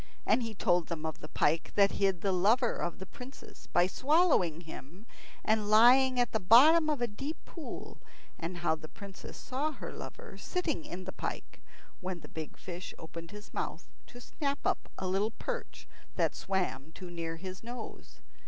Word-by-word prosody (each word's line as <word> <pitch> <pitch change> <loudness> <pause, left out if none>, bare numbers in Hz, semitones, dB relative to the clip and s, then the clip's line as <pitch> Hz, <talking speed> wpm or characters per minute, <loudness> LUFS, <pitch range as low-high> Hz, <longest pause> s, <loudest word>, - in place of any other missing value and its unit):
And - - +4
he 225 -2 -4
told 175 -3 +2
them 160 -2 -4
of 160 -2 -3
the - - -8
pike 155 +2 +1
that 200 -1 +6
hid 195 -3 +1
the 195 - +2
lover 220 +7 +4
of 175 - -2
the 190 - -7
princess 250 +7 -12
by 175 - +4
swallowing 260 - +3
him 165 - -10 0.4
and 215 -1 +2
lying 250 +4 +7
at 245 - +2
the 220 - +1
bottom 300 - +7
of 295 -5 0
a - - +2
deep 270 +9 -5
pool, 330 - -8 0.4
and 175 +2 -4
how 175 -2 +2
the 155 0 -6
princess 195 +3 -10
saw 280 +5 -2
her - - -7
lover - - -8
sitting 335 - -1
in 185 +1 -6
the 190 - -5
pike, - - -5 0.4
when 185 -2 -4
the - - -10
big 160 -1 -7
fish 180 0 -7
opened 165 +1 -8
his 210 +2 -11
mouth - - -3 0.2
to 245 - -12
snap 280 +3 -2
up - - 0
a 190 - -2
little 195 +3 +2
perch 485 -1 -5 0.3
that - - +2
swam 185 -6 -2
too 180 -1 -8
near 165 -1 -3
his 185 +2 -7
nose. 235 0 -8
195 Hz, 180 wpm, -32 LUFS, 175-250 Hz, 0.4 s, lying